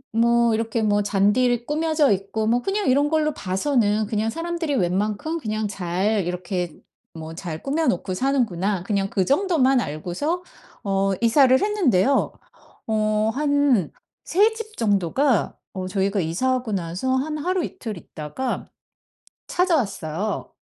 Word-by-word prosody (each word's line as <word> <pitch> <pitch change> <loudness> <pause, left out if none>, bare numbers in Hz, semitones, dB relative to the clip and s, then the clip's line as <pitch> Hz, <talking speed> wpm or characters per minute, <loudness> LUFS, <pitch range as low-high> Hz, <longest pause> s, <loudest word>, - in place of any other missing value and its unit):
뭐 235 0 +3
이렇게 225 0 -1
뭐 205 -1 +2
잔디를 215 +5 +2
꾸며져 310 -1 +2
있고 200 +3 -1
뭐 240 +2 +2
그냥 395 +4 -1
이런 285 +3 +3
걸로 305 -2 +1
봐서는 210 +2 0
그냥 220 +1 -1
'사람들이 330 +1 -2
웬만큼 210 - -1
그냥 215 -4 -2
잘 195 +1 -1
이렇게 180 -1 -3 0.4
뭐 160 0 -7
잘 165 -2 -6
꾸며 305 +3 0
놓고 185 +1 0
사는구나.' 205 -7 0
그냥 195 -1 -1
그 190 - 0
정도만 275 - +3
알고서 180 - -3 0.4
어 195 0 +1
이사를 260 +2 +5
했는데요. 280 - +2 0.6
어 215 0 +1
한 285 - +2 0.3
3 420 +5 +3
집 440 -1 -8
정도가 215 - +1 0.2
어 185 -1 -4
저희가 195 +1 0
이사하고 245 +7 -1
나서 185 +9 -1
한 305 +4 -1
하루이틀 340 - -3
있다가 160 - -5 0.8
찾아왔어요. 210 - -1
225 Hz, 275 characters per minute, -23 LUFS, 195-285 Hz, 0.8 s, 이사를